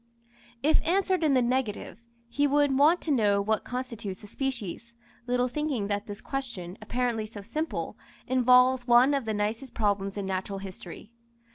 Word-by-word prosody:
If 310 +2 +4
answered 370 0 +1
in 295 -3 +3
the 255 - +4
negative, 240 -4 -2 0.3
he 285 +5 +1
would 285 -1 +3
want 305 +6 +4
to 315 - -2
know 210 -6 +3
what 215 +1 0
constitutes 230 -6 -5
a - - -8
species, 235 -1 -5 0.3
little 250 0 +1
thinking 255 -6 -2
that 205 +2 -2
this 205 -1 -7
question, 230 -10 -5
apparently 230 0 -1
so 210 -2 -10
simple, 310 +10 -3 0.3
involves 250 0 +4
one 245 +4 +6
of 275 -4 0
the 220 - -1
nicest 220 +5 -3
problems 200 -2 0
in 200 - -3
natural 190 +1 -3
history. 195 +1 -9
240 Hz, 160 wpm, -28 LUFS, 205-270 Hz, 0.3 s, one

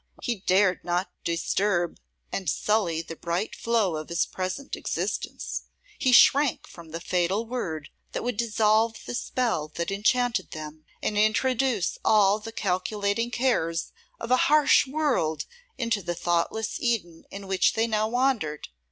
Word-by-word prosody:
he 240 - 0
dared 185 0 +2
not 175 +2 -1
disturb 175 +1 0 0.3
and 190 -5 -2
sully 175 -3 +1
the 165 - -8
bright 170 +6 -3
flow 225 -7 +1
of 155 0 -6
his 170 0 +1
present 185 +9 -4
existence; - - -3 0.3
he 260 - +3
shrank 275 +2 +5
from 170 -2 -13
the 165 +1 -5
fatal 180 +5 0
word 165 - -4 0.2
that - - -4
would 245 -1 -1
dissolve 220 0 +2
the - - -5
spell 235 -10 -1
that 170 +3 -2
enchanted 245 +4 +1
them, 155 0 -8 0.2
and 210 -1 0
introduce 225 -1 +1
all 210 -1 +4
the 225 +1 -8
calculating 200 +3 -1
cares 225 -10 0 0.3
of 235 - -5
a 255 - +6
harsh 300 -2 +5
world 260 - 0 0.3
into 230 -4 0
the 175 -1 -3
thoughtless 175 +6 -1
Eden 200 -9 -1
in 200 0 -8
which 190 -1 +2
they 225 - +1
now 215 -1 0
wandered. 235 - 0
205 Hz, 145 wpm, -26 LUFS, 175-235 Hz, 0.3 s, a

